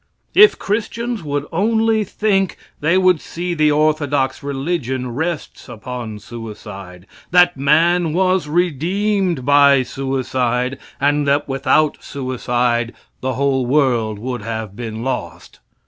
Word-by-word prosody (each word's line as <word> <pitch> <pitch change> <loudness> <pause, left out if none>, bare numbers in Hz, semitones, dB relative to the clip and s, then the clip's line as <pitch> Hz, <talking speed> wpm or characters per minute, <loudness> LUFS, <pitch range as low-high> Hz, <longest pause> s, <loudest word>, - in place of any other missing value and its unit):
If 425 +2 +7
Christians 230 +2 -2
would 145 -2 -3
only 220 +4 +2
think, 195 -2 0 0.2
they 165 +5 +2
would 185 -4 +3
see 175 +1 -4
the 155 -2 +3
orthodox 145 -3 +1
religion 135 -3 -3
rests 160 0 -4
upon 120 -1 -6
suicide 100 -5 -9 0.2
that 180 0 +5
man 160 +5 +3
was 185 -1 +1
redeemed 180 +1 0
by 140 -1 +5
suicide, 130 -1 -2 0.2
and 145 +1 +1
that 145 +1 +2
without 140 +3 +1
suicide 125 -3 -1 0.2
the 130 0 -2
whole 130 -1 0
world 120 -6 +1
would 120 +2 -4
have 110 -2 -5
been 110 -1 -6
lost. 125 -11 -5
140 Hz, 115 wpm, -19 LUFS, 125-175 Hz, 0.2 s, If